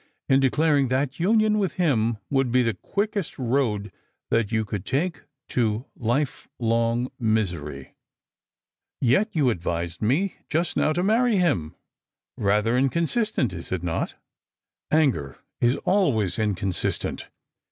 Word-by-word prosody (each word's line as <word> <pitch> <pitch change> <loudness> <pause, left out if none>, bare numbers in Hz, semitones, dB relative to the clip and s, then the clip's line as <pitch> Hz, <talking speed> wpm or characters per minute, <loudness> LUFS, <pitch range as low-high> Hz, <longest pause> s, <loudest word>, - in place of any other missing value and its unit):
215 135 - +5
in - - +5
declaring 140 +1 +3
that 135 +3 -1
union 215 +3 +3
with 195 -3 0
him 120 -10 +1
would 135 -3 +2
be 125 +1 +4
the 115 -1 +1
quickest 200 - -3
road 115 -5 0 0.4
that 115 -2 +1
you 110 -1 +1
could 100 -2 -4
take 155 +3 -1 0.3
to 115 0 0
life 125 +5 -1
long 115 +1 +1
misery." 90 - -2 0.6
" - - -67 0.2
Yet 140 - +3
you 140 -6 +3
advised 85 -2 -3
me 145 - +1
just 165 +2 0
now 155 - +2
to 175 +3 0
marry 225 +2 +3
hira. 140 - +1 0.7
Eather 105 +3 +2 0.2
incon 170 +5 0
Bistent, 215 - 0
is 85 -1 -7
it 90 -2 -2
not?" 85 -2 -2 0.4
" - - -52
Anger 80 - 0 0.2
is 120 +2 +3
always 115 - +2
inconsistent. 100 -4 -2
125 Hz, 140 wpm, -25 LUFS, 105-160 Hz, 0.7 s, 215